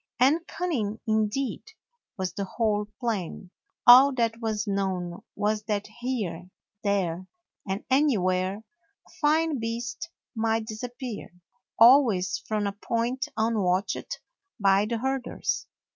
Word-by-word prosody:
And 300 Hz, +7 st, +3 dB
cunning 230 Hz, -, -2 dB
indeed 220 Hz, +4 st, 0 dB, 0.6 s
was 185 Hz, -2 st, -2 dB
the 200 Hz, -, -3 dB
whole 210 Hz, 0 st, 0 dB
plan. 195 Hz, -6 st, -3 dB, 0.3 s
All 260 Hz, +2 st, +9 dB
that 230 Hz, -2 st, 0 dB
was 215 Hz, -2 st, -1 dB
known 190 Hz, -3 st, -2 dB
was 210 Hz, +1 st, 0 dB
that 205 Hz, -2 st, -1 dB
here, 210 Hz, -9 st, -3 dB, 0.3 s
there, 185 Hz, -3 st, 0 dB, 0.4 s
and 190 Hz, +3 st, -3 dB
anywhere 200 Hz, -8 st, +1 dB, 0.4 s
a -, -, -23 dB
fine 310 Hz, -1 st, +2 dB
beast 235 Hz, +7 st, -4 dB, 0.2 s
might 225 Hz, -1 st, 0 dB
disappear, 240 Hz, +1 st, -6 dB, 0.5 s
always 225 Hz, -7 st, +5 dB
from 215 Hz, -1 st, 0 dB
a 200 Hz, -, 0 dB
point 235 Hz, +5 st, -2 dB
unwatched 205 Hz, -4 st, 0 dB, 0.4 s
by 200 Hz, 0 st, +4 dB
the 230 Hz, +1 st, -1 dB
herders. 265 Hz, +2 st, -2 dB
220 Hz, 115 wpm, -27 LUFS, 200-245 Hz, 0.6 s, All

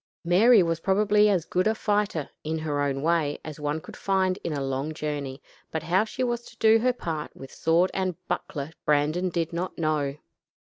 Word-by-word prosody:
Mary 200 Hz, +5 st, +6 dB
was 165 Hz, -1 st, -1 dB
probably 210 Hz, +3 st, +3 dB
as 185 Hz, -6 st, +1 dB
good 185 Hz, +3 st, +1 dB
a 220 Hz, -, +2 dB
fighter, 205 Hz, -8 st, 0 dB, 0.2 s
in 160 Hz, +1 st, -2 dB
her 150 Hz, -2 st, -2 dB
own 140 Hz, -1 st, -1 dB
way, 160 Hz, -3 st, +1 dB
as 155 Hz, -2 st, -7 dB
one 150 Hz, +1 st, -1 dB
could -, -, -11 dB
find 190 Hz, -1 st, 0 dB
in 170 Hz, -, -2 dB
a 145 Hz, -, -2 dB
long 135 Hz, +3 st, -2 dB
journey, 145 Hz, -3 st, -4 dB, 0.3 s
but 160 Hz, -1 st, -3 dB
how 180 Hz, +5 st, +3 dB
she 250 Hz, +3 st, -4 dB
was 240 Hz, -1 st, -1 dB
to 230 Hz, -, -15 dB
do 220 Hz, 0 st, +5 dB
her 250 Hz, +3 st, +3 dB
part 160 Hz, -10 st, -4 dB
with 135 Hz, -, -11 dB
sword 170 Hz, +3 st, +2 dB
and 185 Hz, -2 st, -1 dB
buckler 155 Hz, -4 st, -3 dB
Brandon 150 Hz, +5 st, +2 dB
did 170 Hz, -1 st, -2 dB
not 175 Hz, +2 st, -3 dB
know. 150 Hz, -3 st, 0 dB
165 Hz, 195 wpm, -26 LUFS, 150-195 Hz, 0.3 s, Mary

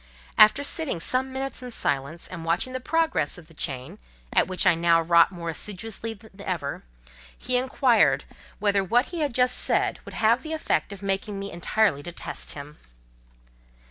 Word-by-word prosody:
After 215 Hz, +7 st, +6 dB
sitting 285 Hz, -, 0 dB
some 255 Hz, +8 st, 0 dB
minutes 265 Hz, 0 st, -4 dB
in 250 Hz, -, -7 dB
silence, 145 Hz, -, -2 dB
and 170 Hz, -3 st, -7 dB
watching 170 Hz, +10 st, 0 dB
the 255 Hz, -, -2 dB
progress 315 Hz, -, 0 dB
of 175 Hz, -, -12 dB
the 165 Hz, -, -18 dB
chain, 145 Hz, +6 st, -4 dB, 0.3 s
at -, -, +4 dB
which 185 Hz, -1 st, -1 dB
I -, -, +6 dB
now 165 Hz, 0 st, +3 dB
wrought 170 Hz, +2 st, +5 dB
more 170 Hz, -2 st, -4 dB
assiduously 220 Hz, +5 st, -5 dB
than 205 Hz, -1 st, -16 dB
ever, 175 Hz, -8 st, -3 dB, 0.6 s
he 255 Hz, -, -2 dB
inquired: 255 Hz, -1 st, +3 dB, 0.3 s
"Whether 200 Hz, -2 st, +2 dB
what 240 Hz, +7 st, +3 dB
he 345 Hz, -, -5 dB
had 290 Hz, -6 st, -1 dB
just 250 Hz, 0 st, +3 dB
said -, -, +1 dB
would -, -, -10 dB
have 230 Hz, +3 st, +3 dB
the 315 Hz, 0 st, -5 dB
effect 260 Hz, -, -1 dB
of 200 Hz, 0 st, -9 dB
making 195 Hz, +1 st, -2 dB
me 195 Hz, 0 st, -5 dB
entirely 175 Hz, -2 st, +1 dB
detest 175 Hz, +3 st, -5 dB
him?" 150 Hz, +1 st, -10 dB
200 Hz, 175 wpm, -25 LUFS, 170-250 Hz, 0.6 s, After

